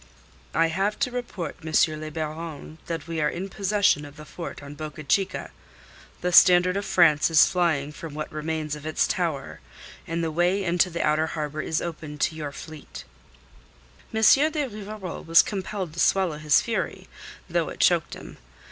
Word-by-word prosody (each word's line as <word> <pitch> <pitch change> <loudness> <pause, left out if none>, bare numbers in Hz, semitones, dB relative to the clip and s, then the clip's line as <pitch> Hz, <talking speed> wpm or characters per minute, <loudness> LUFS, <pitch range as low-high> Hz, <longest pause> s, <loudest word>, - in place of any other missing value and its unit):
"I 165 0 +3
have 195 +5 -1
to 255 -3 +1
report, 240 -9 -5
M. 155 -1 +2
le 155 - -5
Baron, 155 0 -6
that 165 -1 -4
we 165 -1 -2
are 150 - +2
in 190 +3 -5
possession 200 -5 +2
of 145 0 -11
the 150 - -11
fort 170 -2 -8
on 140 0 -9
Boca 155 0 -7
Chica. 190 +7 0 0.7
The 180 - 0
standard 180 +1 +6
of 200 0 -2
France 155 -4 +4
is 160 -1 +6
flying 160 -5 0
from 150 0 -9
what 155 0 -5
remains 155 0 -3
of 150 +1 -8
its 155 - +1
tower, 165 -7 -2 0.5
and 165 0 -2
the 160 - -1
way 175 +5 +1
into 175 0 +2
the 170 -1 -2
outer 155 +1 +2
harbour 155 -1 -4
is 160 - -2
open 155 -3 -6
to 155 - 0
your 150 -2 -5
fleet." 155 +1 -10 1.1
M. 220 0 -1
de 300 +5 +5
Rivarol 210 -4 -7
was 165 0 +6
compelled 190 -4 -4
to 170 - -7
swallow 180 -6 +2
his 150 -2 +4
fury, - - -3 0.4
though - - 0
it - - -9
choked - - +2
him. - - -11
165 Hz, 175 wpm, -25 LUFS, 155-185 Hz, 1.1 s, standard